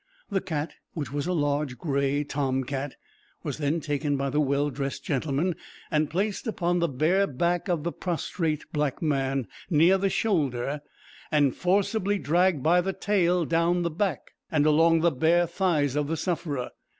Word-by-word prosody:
The 195 Hz, -1 st, +1 dB
cat, 160 Hz, -4 st, -3 dB, 0.2 s
which 145 Hz, -7 st, -4 dB
was 145 Hz, +2 st, -2 dB
a -, -, 0 dB
large 145 Hz, -5 st, 0 dB
gray 140 Hz, +1 st, 0 dB
tom 135 Hz, -2 st, -1 dB
cat, 135 Hz, +1 st, -4 dB, 0.5 s
was -, -, -4 dB
then 150 Hz, +2 st, 0 dB
taken 145 Hz, -1 st, -1 dB
by 135 Hz, 0 st, -1 dB
the 150 Hz, -, +1 dB
well 145 Hz, +1 st, +1 dB
dressed 135 Hz, +1 st, -4 dB
gentleman, 150 Hz, +4 st, 0 dB, 0.4 s
and 155 Hz, -1 st, +2 dB
placed 200 Hz, +7 st, -1 dB
upon 175 Hz, -5 st, 0 dB
the 170 Hz, -, +2 dB
bare 170 Hz, +8 st, +2 dB
back 170 Hz, +7 st, 0 dB
of 170 Hz, -5 st, 0 dB
the 170 Hz, -, -1 dB
prostrate 165 Hz, -3 st, -2 dB
black 150 Hz, 0 st, -1 dB
man, 135 Hz, -4 st, 0 dB, 0.2 s
near 175 Hz, +3 st, +5 dB
the 195 Hz, 0 st, +1 dB
shoulder, 150 Hz, -, 0 dB, 0.5 s
and 145 Hz, -4 st, +3 dB
forcibly 200 Hz, +2 st, +1 dB
dragged 175 Hz, -3 st, +2 dB
by 175 Hz, +3 st, +4 dB
the 190 Hz, +2 st, -2 dB
tail 180 Hz, -5 st, +1 dB
down 170 Hz, +2 st, +2 dB
the 170 Hz, -, -1 dB
back, 180 Hz, -2 st, -2 dB, 0.2 s
and 150 Hz, -2 st, +3 dB
along 165 Hz, +2 st, +4 dB
the 170 Hz, 0 st, +4 dB
bare 165 Hz, +5 st, +3 dB
thighs 165 Hz, -6 st, 0 dB
of 150 Hz, -1 st, 0 dB
the 165 Hz, +2 st, -1 dB
sufferer. 155 Hz, -6 st, -2 dB
155 Hz, 170 wpm, -27 LUFS, 145-175 Hz, 0.5 s, near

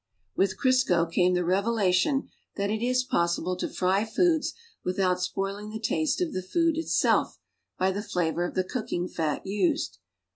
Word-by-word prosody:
With 190 Hz, -1 st, +1 dB
Crisco 255 Hz, -11 st, +3 dB
came 180 Hz, +2 st, +2 dB
the 180 Hz, -1 st, 0 dB
revelation 200 Hz, -, +2 dB, 0.3 s
that 200 Hz, 0 st, -1 dB
it 220 Hz, +1 st, -2 dB
is 250 Hz, +1 st, +2 dB
possible 170 Hz, -4 st, 0 dB
to -, -, -3 dB
fry 190 Hz, +2 st, +1 dB
foods 320 Hz, +8 st, +1 dB, 0.3 s
without 180 Hz, 0 st, 0 dB
spoiling 195 Hz, +3 st, -3 dB
the 215 Hz, -, -5 dB
taste 155 Hz, -, 0 dB
of 350 Hz, -3 st, -1 dB
the 185 Hz, -, -2 dB
food 330 Hz, -, +1 dB
itself 325 Hz, +1 st, +1 dB, 0.4 s
l)y 190 Hz, +1 st, +2 dB
the 200 Hz, +2 st, -3 dB
flavor 175 Hz, -4 st, -1 dB
of 175 Hz, -, -4 dB
the 185 Hz, -, +2 dB
cooking 215 Hz, -5 st, -3 dB
fat 155 Hz, -5 st, -2 dB
u.sed. 290 Hz, -, 0 dB
195 Hz, 160 wpm, -27 LUFS, 180-245 Hz, 0.4 s, Crisco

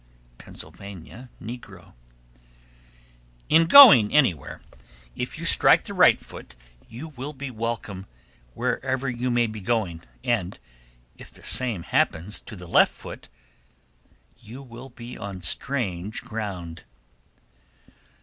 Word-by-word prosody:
Pennsylvania 100 Hz, +6 st, -12 dB
(negro). 105 Hz, -6 st, -11 dB, 1.6 s
1324. -, -, +6 dB
In 165 Hz, +1 st, +6 dB
going 190 Hz, -, +9 dB
anywhere, 125 Hz, -, 0 dB, 0.5 s
if -, -, -5 dB
you -, -, -7 dB
strike -, -, +5 dB
the -, -, -6 dB
right -, -, +5 dB
foot 60 Hz, -, -12 dB, 0.3 s
you 125 Hz, +8 st, -9 dB
will 140 Hz, +1 st, -8 dB
be 135 Hz, -1 st, -7 dB
welcome 110 Hz, -4 st, -5 dB, 0.5 s
wherever 130 Hz, 0 st, -2 dB
you 125 Hz, 0 st, -2 dB
may 120 Hz, -1 st, +2 dB
be 110 Hz, -2 st, -7 dB
going, 95 Hz, -6 st, -2 dB, 0.2 s
and 100 Hz, -6 st, -2 dB, 0.6 s
if -, -, -13 dB
the -, -, -17 dB
same 120 Hz, -9 st, +2 dB
happens 85 Hz, +6 st, -1 dB
to 110 Hz, -, -11 dB
the 90 Hz, -2 st, -11 dB
left 85 Hz, -, +4 dB
foot, -, -, -11 dB, 1.1 s
you 125 Hz, +6 st, -11 dB
will 125 Hz, +1 st, -12 dB
be 120 Hz, 0 st, -11 dB
on 100 Hz, -4 st, -8 dB
strange 105 Hz, -, -2 dB
ground. 95 Hz, -7 st, -7 dB
115 Hz, 120 wpm, -24 LUFS, 95-130 Hz, 1.6 s, going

